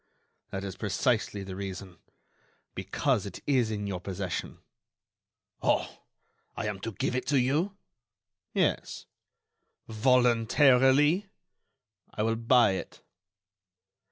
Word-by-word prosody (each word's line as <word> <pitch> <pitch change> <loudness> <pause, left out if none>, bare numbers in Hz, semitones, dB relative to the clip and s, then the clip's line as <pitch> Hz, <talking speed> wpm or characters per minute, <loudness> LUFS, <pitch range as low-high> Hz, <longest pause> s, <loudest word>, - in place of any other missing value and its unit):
"That 95 0 -5
is 95 -1 -6
precisely 105 -1 0
the 95 -1 -7
reason—because 95 -2 -5
it - - -8
is 130 -6 +2
in 105 -2 -3
your 95 -3 -3
possession." 95 0 -5 1.0
"Oh! - - 0 0.6
I - - -3
am 105 -2 -3
to 115 +3 -5
give 125 - -2
it 125 - -2
to 140 -2 +3
you?" 155 +11 0 0.7
"Yes." - - -1 0.8
"Voluntarily?" 130 - +4 0.8
"I 105 - -2
will 115 +1 +1
buy 115 -1 +4
it." 95 - -6
115 Hz, 100 wpm, -28 LUFS, 100-130 Hz, 1.0 s, Voluntarily